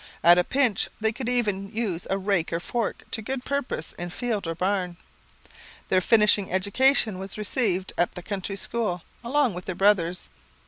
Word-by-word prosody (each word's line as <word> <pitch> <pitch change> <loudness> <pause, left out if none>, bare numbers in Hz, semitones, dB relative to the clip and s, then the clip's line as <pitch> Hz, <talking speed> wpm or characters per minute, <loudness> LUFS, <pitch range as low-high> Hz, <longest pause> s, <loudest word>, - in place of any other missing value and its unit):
At 175 +1 +7
a - - +3
pinch, 255 -2 +1
they 220 0 +1
could 240 +2 -4
even 205 -6 +1
use 210 -7 -2
a 195 - +1
rake 195 -4 0
or 165 - -1
fork 230 +5 -3
to 220 - -1
good 260 +3 -4
purpose 280 - -3
in 175 0 -4
field 215 -1 -3
or 165 - -3
barn. 180 -1 -1 0.9
Their 185 - +3
finishing 210 -1 +4
education 205 +2 +3
was 195 +2 -6
received 205 -3 0
at 175 - +1
the 180 - -7
country 195 0 -4
school 200 -4 -2 0.2
along 260 -1 +1
with 180 +1 -7
their 185 - -4
brothers. 180 -3 +2
200 Hz, 175 wpm, -25 LUFS, 180-230 Hz, 0.9 s, At